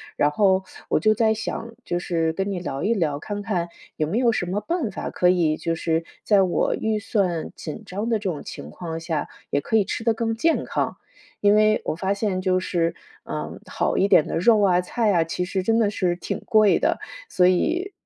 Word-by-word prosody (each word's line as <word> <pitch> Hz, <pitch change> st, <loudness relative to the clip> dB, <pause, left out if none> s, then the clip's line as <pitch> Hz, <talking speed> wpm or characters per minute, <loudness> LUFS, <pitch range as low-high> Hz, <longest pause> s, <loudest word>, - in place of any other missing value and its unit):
然 145 Hz, -, +2 dB
后 190 Hz, +2 st, +3 dB, 0.2 s
我 -, -, +2 dB
就 215 Hz, 0 st, +4 dB
在 220 Hz, 0 st, +2 dB
想， 225 Hz, +1 st, -5 dB
就 175 Hz, -, -1 dB
是 165 Hz, -2 st, 0 dB
跟 195 Hz, +4 st, -2 dB
你 195 Hz, -, -2 dB
聊 140 Hz, -6 st, -4 dB
一 230 Hz, +3 st, +2 dB
聊， 155 Hz, -7 st, 0 dB
看 205 Hz, +5 st, -5 dB
看 180 Hz, -5 st, -1 dB, 0.3 s
有 155 Hz, -, 0 dB
没 185 Hz, +8 st, -1 dB
有 240 Hz, -1 st, +4 dB
什 185 Hz, -5 st, -2 dB
么 190 Hz, +3 st, -1 dB
办 335 Hz, -6 st, -1 dB
法 190 Hz, -, -5 dB
可 180 Hz, -, +3 dB
以， 170 Hz, -4 st, +3 dB
就 165 Hz, -, -2 dB
是 165 Hz, 0 st, 0 dB, 0.2 s
在 205 Hz, -2 st, +4 dB
我 185 Hz, -2 st, +1 dB
预 220 Hz, -1 st, -1 dB
算 195 Hz, -6 st, -1 dB
紧 160 Hz, +8 st, -7 dB
张 205 Hz, +5 st, -3 dB
的 225 Hz, -, +2 dB
这 200 Hz, -2 st, -3 dB
种 150 Hz, -, -6 dB
情 75 Hz, -, -8 dB
况 165 Hz, -, -6 dB
下， 165 Hz, -2 st, -2 dB, 0.3 s
也 145 Hz, -, +1 dB
可 180 Hz, -, -2 dB
以 215 Hz, -, +5 dB
吃 215 Hz, +3 st, -4 dB
得 230 Hz, -, +4 dB
更 225 Hz, 0 st, -1 dB
健 325 Hz, +7 st, +1 dB
康。 -, -, -2 dB, 0.5 s
因 205 Hz, 0 st, +5 dB
为 215 Hz, 0 st, +4 dB
我 -, -, 0 dB
发 190 Hz, +4 st, 0 dB
现 200 Hz, -2 st, -1 dB
就 185 Hz, -1 st, +2 dB
是， 170 Hz, -2 st, -1 dB, 0.3 s
嗯， -, -, -5 dB
好 -, -, -1 dB
一 195 Hz, -, +3 dB
点 155 Hz, -, +5 dB
的 -, -, -2 dB
肉 215 Hz, +5 st, +4 dB
啊、 185 Hz, -3 st, +4 dB
菜 215 Hz, +4 st, 0 dB
啊， 170 Hz, -4 st, +3 dB
其 165 Hz, +2 st, -2 dB
实 190 Hz, +1 st, -2 dB
真 225 Hz, +4 st, +2 dB
的 215 Hz, -3 st, +3 dB
是 180 Hz, -4 st, 0 dB
挺 175 Hz, -, -4 dB
贵 215 Hz, -4 st, +4 dB
的。 -, -, +1 dB, 0.3 s
所 180 Hz, -, +3 dB
以 335 Hz, -, +1 dB
195 Hz, 240 characters per minute, -23 LUFS, 170-215 Hz, 0.5 s, 以